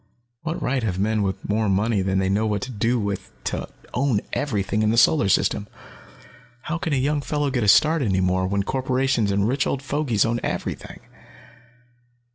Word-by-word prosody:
What 165 +1 -3
right 130 +1 -1
have 100 -5 -2
men 110 +2 +1
with 95 -1 -3
more 105 0 +1
money 100 +2 +1
than 95 0 0
they 95 0 +1
know 105 +3 +1
what 105 -2 -1
to 130 - -5
do 115 +2 0
with 100 -2 -4
to - - -3 0.2
own 125 -4 +1
everything 105 -6 -1
in 110 - +2
the 115 - +1
Solar 120 -2 +4
System? 100 +2 +1 1.0
How 170 +2 -3
can 165 - -3
a - - +2
young 145 +3 +1
fellow 145 -1 -1
get 125 -3 0
a - - 0
start 155 +9 +5
any 95 -7 +1
more, 95 0 +1
when 100 +1 0
corporations 130 -2 0
and 100 +1 +1
rich 135 +4 0
old 135 - -2
fogies 140 -6 +1
own 115 +1 0
everything? - - -4
110 Hz, 190 wpm, -23 LUFS, 100-135 Hz, 1.0 s, start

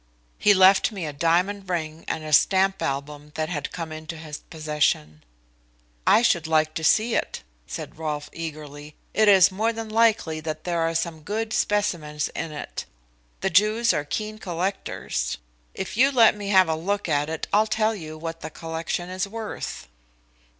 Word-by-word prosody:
He 205 -1 +5
left 190 +3 +6
me 195 -6 -5
a 150 - -4
diamond 180 +6 +1
ring 160 -2 -3
and 160 - -3
a 155 0 -4
stamp 190 +4 +4
album 145 +2 -4
that 155 0 -2
had 150 -5 -3
come 165 -2 -5
into 155 +1 -7
his 155 -2 -7
possession." 150 - -1 0.8
"I 230 - +6
should 170 -8 +2
like 155 -1 +2
to 160 - -4
see 220 +8 +3
it," - - -2 0.2
said - - -7
Rolfe 150 -2 -3
eagerly. 150 -2 -7 0.2
"It 215 0 +3
is 190 -2 +7
more 220 +4 0
than 225 -1 -6
likely 215 -8 +2
that 155 0 -5
there 175 -1 -1
are 165 0 0
some 165 -1 -2
good 215 +6 -3
specimens 160 -8 0
in 165 -1 -5
it. 150 - -6 0.6
The 195 - 0
Jews 215 +6 +4
are 145 - -1
keen 215 +8 -4
collectors. 175 - -3 0.4
If 190 - -5
you 265 +5 +5
let 230 -5 +6
me 205 -1 -6
have 190 -3 +5
a 160 - +1
look 200 +6 -2
at 145 +1 +1
it, 160 -1 -3
I'll 215 +1 +4
tell 220 0 +1
you 155 -6 -8
what 165 +1 -6
the - - -5
collection 165 +2 -4
is 185 +2 -2
worth." 220 +1 -6
165 Hz, 175 wpm, -24 LUFS, 155-205 Hz, 0.8 s, is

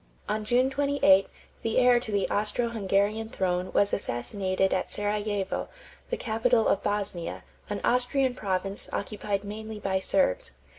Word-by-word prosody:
On 215 +1 -1
June 250 +4 +2
28, 275 -9 +4 0.3
the 225 - -1
heir 250 -1 +6
to 230 -3 -7
the 200 -1 +1
Austro 215 +3 0
Hungarian 210 0 0
throne 180 -3 -1
was 200 - +2
assassinated 190 - 0
at 185 - -1
Serajevo, 205 -1 -1 0.4
the 485 - -1
capital 225 0 +2
of 195 - +2
Bosnia, 200 -4 -3 0.3
an 205 -1 -3
Austrian 250 +1 +2
province 195 -3 -3
occupied 200 -1 -2
mainly 215 +1 -6
by 190 -2 0
Serbs. 190 - +1
205 Hz, 140 wpm, -28 LUFS, 195-225 Hz, 0.4 s, heir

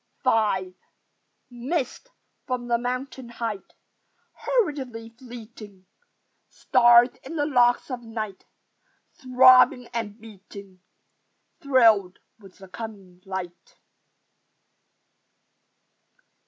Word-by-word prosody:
V 190 -4 +1 0.8
Mist 265 - -4 0.4
from 250 -1 -3
the 235 -1 +1
mountain 255 +1 -5
height 230 -4 -6 0.6
Hurriedly 270 - -2
fleeting: 230 -5 -13 0.6
Star 240 -2 +5 0.2
in 290 +5 -9
the 290 -2 0
locks 245 -2 +2
of 250 -1 -5
Night 220 -4 -7 0.7
Throbbing 255 0 +5
and 225 -2 -5
beating, 200 -3 -14 0.8
Thrilled 225 -9 +3 0.2
with 195 -3 -17
the 190 - -14
coming 195 -3 -10
light. 185 -2 -7
235 Hz, 80 wpm, -24 LUFS, 205-255 Hz, 0.8 s, Star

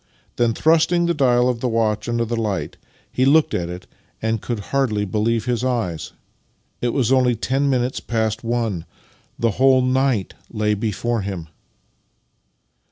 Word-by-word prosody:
Then, 115 -2 +2
thrust 160 +1 +3
ing 175 -1 +2
the 170 - +1
dial 125 -5 +3
of 125 -2 0
the 125 - -1
watch 110 -1 0
under 120 0 0
the 120 +1 -2
light, 105 -4 -2 0.4
he 130 - 0
looked 150 +4 +4
at 85 -1 -1
it, 90 +1 -7 0.3
and 110 -1 -1
could 120 -3 -3
hardly 110 -7 +1
believe 110 +3 0
his 125 -1 -1
eyes! 115 -11 -2 0.7
It 120 - +1
was 130 -1 0
only 125 -2 +4
ten 135 +5 0
minutes 130 -1 0
past 110 -1 -2
one! 115 -7 -1 0.5
The 115 -1 +1
whole 130 +3 +4
night 130 -5 +1 0.2
lay 105 -2 0
before 110 +2 -1
him! 95 -5 -5
120 Hz, 160 wpm, -21 LUFS, 110-130 Hz, 0.7 s, looked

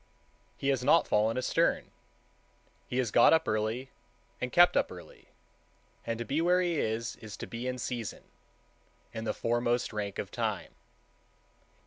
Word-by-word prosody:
He 140 - -1
has 135 -3 +1
not 150 +5 +4
fallen 110 +3 +2
astern; 130 - +1 1.0
he 125 - -3
has 125 -5 0
got 120 - +6
up 160 0 +3
early 110 +5 -1 0.5
and 125 - -2
kept 175 0 +6
up - - +2
early, - - -12 0.8
and 115 -1 -1
to 120 - -4
be 145 +6 0
where 180 +2 +4
he 175 -4 0
is, 115 +1 -2
is 110 -3 -9
to - - -6
be 120 +2 -5
in 125 0 -2
season, 120 -3 -4 0.9
in 110 -1 -5
the - - +1
foremost 120 0 0
rank 100 -2 -3
of - - -4
time. - - -3
120 Hz, 155 wpm, -30 LUFS, 110-135 Hz, 1.0 s, got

